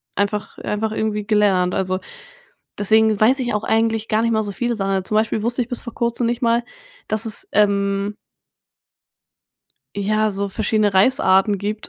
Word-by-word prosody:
einfach 205 Hz, 0 st, -2 dB
einfach 215 Hz, +1 st, -2 dB
irgendwie 215 Hz, -1 st, -2 dB
gelernt. 195 Hz, -4 st, +2 dB
Also, 185 Hz, -1 st, -1 dB, 0.8 s
deswegen 220 Hz, +1 st, +3 dB
weiß 255 Hz, +5 st, +4 dB
ich 240 Hz, -3 st, -2 dB
auch 210 Hz, -, -1 dB
eigentlich 225 Hz, 0 st, 0 dB
gar 215 Hz, 0 st, +1 dB
nicht 230 Hz, -, +1 dB
mal 220 Hz, -1 st, +1 dB
so 205 Hz, -, -4 dB
viele 240 Hz, +4 st, -2 dB
Sachen, 195 Hz, -1 st, -2 dB
sondern 190 Hz, -1 st, -1 dB
zum 215 Hz, -, -2 dB
Beispiel 220 Hz, -1 st, 0 dB
wusste 245 Hz, +2 st, 0 dB
ich 235 Hz, -, -3 dB
bis 245 Hz, -, -2 dB
vor 235 Hz, -, -8 dB
kurzem 235 Hz, 0 st, -1 dB
nicht 240 Hz, 0 st, -2 dB
mal, 235 Hz, 0 st, +2 dB, 0.4 s
dass 215 Hz, +1 st, -2 dB
es, 220 Hz, -, -4 dB
ähm 200 Hz, 0 st, +1 dB, 1.8 s
ja, 215 Hz, +2 st, +1 dB
so 200 Hz, +1 st, -2 dB
verschiedene 210 Hz, 0 st, 0 dB
Reisarten 195 Hz, -2 st, +3 dB
gibt. 210 Hz, +2 st, -4 dB
215 Hz, 170 wpm, -20 LUFS, 200-225 Hz, 1.8 s, weiß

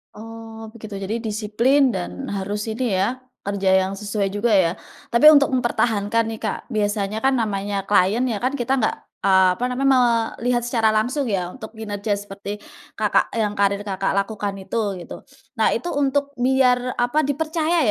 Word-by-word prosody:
Oh 225 Hz, 0 st, -9 dB
begitu, 220 Hz, -2 st, -10 dB
jadi 205 Hz, +4 st, -2 dB
disiplin, 230 Hz, +5 st, +2 dB
dan 90 Hz, -, -4 dB
harus 205 Hz, +2 st, -3 dB
ini 225 Hz, +4 st, -3 dB, 0.2 s
ya, 235 Hz, +6 st, 0 dB, 0.3 s
kerja 200 Hz, -1 st, 0 dB
yang 190 Hz, +1 st, -2 dB
sesuai 205 Hz, -1 st, -2 dB
juga 205 Hz, +4 st, 0 dB
ya. 190 Hz, -4 st, +4 dB, 0.4 s
Tapi 235 Hz, +5 st, +3 dB
untuk 285 Hz, -1 st, +5 dB
mempertahankan 230 Hz, -3 st, +1 dB
nih, 225 Hz, -, -5 dB
Kak, 215 Hz, -2 st, -3 dB
biasanya 205 Hz, -2 st, -1 dB
kan 270 Hz, -, +4 dB
namanya 200 Hz, -2 st, -2 dB
klien 200 Hz, +3 st, +2 dB
ya 220 Hz, -, -1 dB
kan, 255 Hz, +5 st, -1 dB
kita 265 Hz, 0 st, 0 dB
nggak, 220 Hz, -, +1 dB, 0.3 s
eee, 190 Hz, -1 st, +5 dB
apa -, -, -4 dB
namanya, 265 Hz, +1 st, +2 dB, 0.4 s
melihat 240 Hz, 0 st, 0 dB
secara 230 Hz, -2 st, +1 dB
langsung 250 Hz, +7 st, 0 dB
ya, 190 Hz, -6 st, -1 dB
untuk 220 Hz, 0 st, -10 dB
kinerja 210 Hz, -1 st, -3 dB
seperti, 200 Hz, 0 st, -6 dB, 0.3 s
Kakak -, -, +1 dB
yang, 210 Hz, -1 st, -2 dB
karir 200 Hz, 0 st, +2 dB
Kakak 195 Hz, -2 st, -2 dB
lakukan 200 Hz, 0 st, -2 dB
itu, 200 Hz, -2 st, -2 dB
gitu. -, -, -8 dB, 0.4 s
Nah, 220 Hz, -, +3 dB
itu 250 Hz, +10 st, -3 dB
untuk 280 Hz, 0 st, +1 dB
biar, 250 Hz, 0 st, +2 dB
apa, 245 Hz, +5 st, +1 dB
dipercaya 315 Hz, +4 st, 0 dB
220 Hz, 165 wpm, -22 LUFS, 200-250 Hz, 0.4 s, untuk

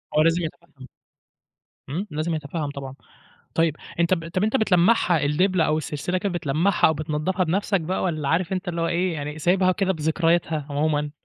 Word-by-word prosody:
هو 155 Hz, -, +5 dB
لازم 165 Hz, +2 st, +3 dB
يتفَهم. 155 Hz, -4 st, -9 dB, 1.0 s
إمم، 180 Hz, +9 st, -3 dB
لازم 155 Hz, +2 st, -1 dB
يتفَهم 150 Hz, 0 st, -4 dB
طبعًا. 135 Hz, -2 st, -7 dB, 0.6 s
طيب 165 Hz, -2 st, +2 dB, 0.2 s
أنت 170 Hz, +2 st, +3 dB
ب 165 Hz, -2 st, -2 dB
طَب 185 Hz, +3 st, -1 dB
أنت 220 Hz, +4 st, +1 dB
بتلَمّعها 180 Hz, -, +3 dB
الدبلة 180 Hz, +4 st, +2 dB
أو 155 Hz, -, +1 dB
السلسلة 155 Hz, +4 st, -2 dB
كده 200 Hz, +2 st, -1 dB
بتلَمّعها 175 Hz, +2 st, +2 dB
أو 160 Hz, -, +2 dB
بتنضفها 155 Hz, +5 st, -1 dB
بنفسك 195 Hz, +2 st, 0 dB
بقى، 180 Hz, +4 st, -2 dB
والّا 155 Hz, -5 st, -1 dB
عارف 170 Hz, +3 st, +1 dB
أنت 185 Hz, 0 st, -3 dB
اللي 170 Hz, -1 st, -2 dB
هو 165 Hz, -, +1 dB
إيه 175 Hz, +1 st, 0 dB
يعني 150 Hz, 0 st, -5 dB
سايبها 185 Hz, +3 st, +3 dB
وكده 190 Hz, +1 st, +1 dB
بذكرياتها 160 Hz, -1 st, 0 dB
عمومًا؟ 150 Hz, 0 st, 0 dB
165 Hz, 175 wpm, -24 LUFS, 150-185 Hz, 1.0 s, هو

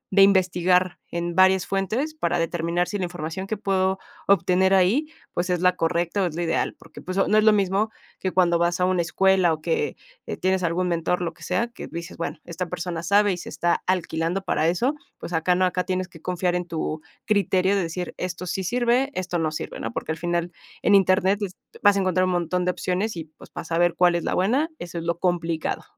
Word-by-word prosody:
de 195 Hz, -, +7 dB
investigar 185 Hz, -2 st, +3 dB
en 170 Hz, 0 st, -3 dB
varias 190 Hz, 0 st, +4 dB
fuentes, 215 Hz, -, -1 dB
para 310 Hz, -, -1 dB
determinar 170 Hz, +1 st, 0 dB
si 205 Hz, -, -3 dB
la -, -, -1 dB
información 175 Hz, +2 st, -5 dB
que 220 Hz, -, -2 dB
puedo 190 Hz, -1 st, +1 dB, 0.3 s
obtener 190 Hz, 0 st, +4 dB
ahí, 200 Hz, +12 st, +3 dB, 0.3 s
pues, 175 Hz, +1 st, -1 dB
es 180 Hz, -1 st, 0 dB
la 180 Hz, 0 st, +4 dB
correcta 170 Hz, +4 st, 0 dB
o 185 Hz, -, +2 dB
es 160 Hz, -, -6 dB
lo 175 Hz, -, -1 dB
ideal". 165 Hz, -, 0 dB
Porque, -, -, -13 dB
pues, 185 Hz, +1 st, -5 dB
no 195 Hz, +2 st, +3 dB
es 215 Hz, -, +5 dB
lo 215 Hz, -, +7 dB
mismo 200 Hz, +1 st, +1 dB, 0.3 s
que 190 Hz, -, -1 dB
cuando 175 Hz, -2 st, +3 dB
vas 170 Hz, +1 st, +1 dB
a 180 Hz, -, +3 dB
una 185 Hz, -1 st, +2 dB
escuela, 185 Hz, 0 st, +3 dB
o 155 Hz, -, -6 dB
que 455 Hz, -2 st, -1 dB, 0.4 s
tienes 190 Hz, 0 st, +1 dB
algún 175 Hz, +1 st, 0 dB
mentor, 175 Hz, +1 st, 0 dB
lo 170 Hz, -1 st, -3 dB
que -, -, -23 dB
sea, 180 Hz, +6 st, 0 dB
que -, -, -8 dB
dices: 170 Hz, +1 st, -7 dB
"Bueno, 165 Hz, -1 st, -4 dB
esta 175 Hz, +1 st, -4 dB
persona 170 Hz, -1 st, -4 dB
sabe 205 Hz, +3 st, +3 dB
y -, -, -4 dB
se -, -, -8 dB
está 170 Hz, +3 st, 0 dB
alquilando 175 Hz, 0 st, -1 dB
para 160 Hz, -4 st, +1 dB
eso". 210 Hz, -, +1 dB, 0.2 s
Pues, 175 Hz, -, -7 dB
acá 165 Hz, +2 st, +2 dB
no, 185 Hz, +1 st, +3 dB
acá 180 Hz, 0 st, 0 dB
tienes 185 Hz, 0 st, -2 dB
que 165 Hz, -3 st, -15 dB
confiar 180 Hz, 0 st, -1 dB
en 175 Hz, 0 st, -2 dB
tu 160 Hz, -2 st, -3 dB, 0.2 s
criterio 195 Hz, -2 st, +2 dB
de 200 Hz, -, +1 dB
decir: 175 Hz, +1 st, -4 dB
"Esto 180 Hz, 0 st, -4 dB
sí 190 Hz, +2 st, -2 dB
sirve, 245 Hz, +6 st, +1 dB
esto 180 Hz, -2 st, -2 dB
no 160 Hz, -1 st, +1 dB
sirve", 155 Hz, -, -6 dB
¿no? 115 Hz, -, -4 dB
Porque, -, -, -3 dB
al 160 Hz, -, -4 dB
final 175 Hz, 0 st, -1 dB, 0.3 s
en 205 Hz, -, +4 dB
Internet 190 Hz, 0 st, +4 dB
est 195 Hz, -2 st, -4 dB, 0.2 s
vas 205 Hz, -1 st, +6 dB
a -, -, +2 dB
encontrar 185 Hz, -1 st, +2 dB
un 185 Hz, -, 0 dB
montón 180 Hz, +1 st, 0 dB
de 180 Hz, -, +2 dB
opciones 185 Hz, +4 st, -2 dB
y, 165 Hz, -2 st, -5 dB
pues, -, -, -15 dB
para -, -, -7 dB
saber 170 Hz, +1 st, +1 dB
cuál 175 Hz, 0 st, +4 dB
es 170 Hz, -1 st, -1 dB
la -, -, -1 dB
buena, 255 Hz, -, +2 dB
eso 175 Hz, -, -6 dB
es 165 Hz, -, -7 dB
lo 170 Hz, 0 st, -1 dB
complicado. 170 Hz, -2 st, -1 dB
180 Hz, 225 wpm, -24 LUFS, 170-190 Hz, 0.4 s, de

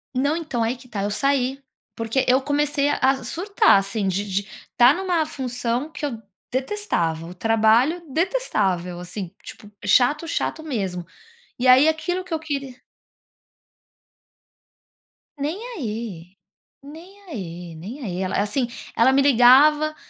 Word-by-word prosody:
Não, 280 Hz, +4 st, +1 dB
então, 310 Hz, -8 st, -3 dB
aí 230 Hz, +2 st, 0 dB
que 250 Hz, 0 st, -16 dB
está, 205 Hz, -5 st, -4 dB
eu 205 Hz, -, -1 dB
saí. 275 Hz, +2 st, 0 dB, 0.3 s
Porque 230 Hz, +4 st, -1 dB
eu 255 Hz, +2 st, +4 dB
comecei 290 Hz, 0 st, +1 dB
a 290 Hz, -, +1 dB
a 265 Hz, 0 st, +2 dB
surtar, 385 Hz, -, +3 dB
assim, 195 Hz, +1 st, -1 dB
de 200 Hz, +2 st, -2 dB
de 195 Hz, +1 st, 0 dB, 0.3 s
estar 245 Hz, +3 st, +6 dB
numa 355 Hz, -3 st, 0 dB
função 250 Hz, -2 st, -3 dB
que 300 Hz, -1 st, -5 dB
eu 235 Hz, -6 st, -5 dB, 0.3 s
detestava, 255 Hz, -, -2 dB
o 175 Hz, -, -9 dB
trabalho 225 Hz, -, +3 dB
detestável 205 Hz, -, -1 dB
assim, 180 Hz, +1 st, -7 dB
tipo, 210 Hz, -, -12 dB
chato, 250 Hz, -, +3 dB
chato 320 Hz, -1 st, -2 dB
mesmo. 195 Hz, -, -3 dB, 0.5 s
E 255 Hz, -, +1 dB
aí 255 Hz, +4 st, +7 dB
aquilo 355 Hz, +4 st, -2 dB
que 365 Hz, -2 st, -7 dB
eu 320 Hz, -, 0 dB
queria 280 Hz, -4 st, -4 dB, 2.6 s
Nem 295 Hz, +5 st, -3 dB, 0.2 s
aí, 210 Hz, -, -6 dB, 0.5 s
nem 335 Hz, +8 st, -13 dB
aí, 175 Hz, -, -7 dB
nem 210 Hz, -, -8 dB
aí, 185 Hz, -4 st, -4 dB
el 185 Hz, -, -3 dB
assim, 210 Hz, +5 st, 0 dB, 0.3 s
ela 240 Hz, +3 st, +5 dB
me 270 Hz, +1 st, +4 dB
ligava, 285 Hz, +4 st, +5 dB
255 Hz, 140 wpm, -22 LUFS, 205-300 Hz, 2.6 s, aí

